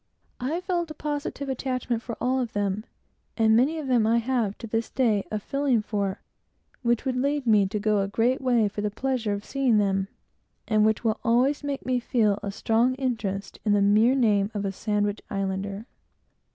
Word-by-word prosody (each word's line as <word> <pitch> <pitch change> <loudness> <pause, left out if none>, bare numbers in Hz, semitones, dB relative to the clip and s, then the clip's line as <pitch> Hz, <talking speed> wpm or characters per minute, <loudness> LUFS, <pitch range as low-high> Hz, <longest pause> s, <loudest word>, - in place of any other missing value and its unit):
I 300 +8 -2
felt 350 -3 -1
a 310 - -7
positive 290 -1 -4
attachment 255 -3 -2
for 235 -1 -6
almost - - -1
all - - +1
of 240 -2 -4
them; 205 +1 -1 0.5
and 220 -1 +4
many 275 +8 +3
of 310 - -4
them 240 -4 +3
I 230 +1 +3
have, 235 -4 0
to - - -8
this 225 +1 -2
time, 225 -6 +2
a 215 - -2
feeling 260 +1 0
for, 200 -3 -2 0.6
which 240 0 +1
would 260 -1 0
lead 280 +2 0
me 210 -4 +4
to 195 - -3
go 210 0 +1
a 195 - 0
great 235 +6 +1
way 240 -5 +3
for 205 +1 -5
the - - -2
mere 205 - -7
pleasure 255 -4 -1
of 205 0 -5
seeing 265 -5 +2
them, 195 -2 +1 0.6
and 215 -1 +3
which 220 +1 0
will 220 -1 0
always 255 +5 +2
make 285 -1 -4
me 255 -1 +1
feel 215 -4 +1
a 200 - -4
strong 230 +5 +1
interest 220 -7 -3
in 210 - +2
the 205 - +3
mere 215 +6 +4
name 210 -6 +2
of 205 -1 -2
a 195 - -1
Sandwich 205 +1 -1
Islander. 195 +1 -3
225 Hz, 205 wpm, -26 LUFS, 205-255 Hz, 0.6 s, and